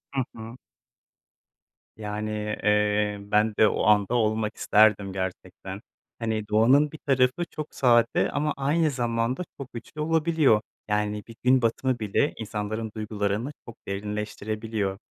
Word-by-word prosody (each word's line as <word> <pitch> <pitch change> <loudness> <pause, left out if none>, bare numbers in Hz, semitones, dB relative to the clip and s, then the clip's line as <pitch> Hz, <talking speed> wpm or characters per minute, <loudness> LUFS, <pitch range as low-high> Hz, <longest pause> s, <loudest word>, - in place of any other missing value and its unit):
Hı 135 - +2
hı. 115 +2 -9 1.4
Yani, 105 0 -4 0.3
eee, 105 0 +2
ben 105 +2 +1
de 110 - +7
o - - 0
anda 105 +2 +3
olmak 110 -2 0
isterdim 105 -2 +3
gerçekten. 95 -1 -6 0.4
Hani, 110 -2 -2
doğanın 130 +8 +4
bir 155 - -9
tarafı 135 +2 +1
çok 155 -1 -7
sade 120 -1 +3
ama 150 +1 0
aynı 150 +3 +2
zamanda 120 +4 -1 0.2
çok 135 -2 -8
güçlü 120 +6 -7
olabiliyor. 160 -7 +3 0.3
Yani, 105 0 -1
bir 115 - -11
gün 130 0 +4
batımı 120 +2 0
bile 110 +7 +1
insanların 110 0 -4
duygularını 105 +3 -2 0.2
çok 115 - -9
derinleştirebiliyor. 105 0 -3
110 Hz, 125 wpm, -26 LUFS, 105-130 Hz, 1.4 s, de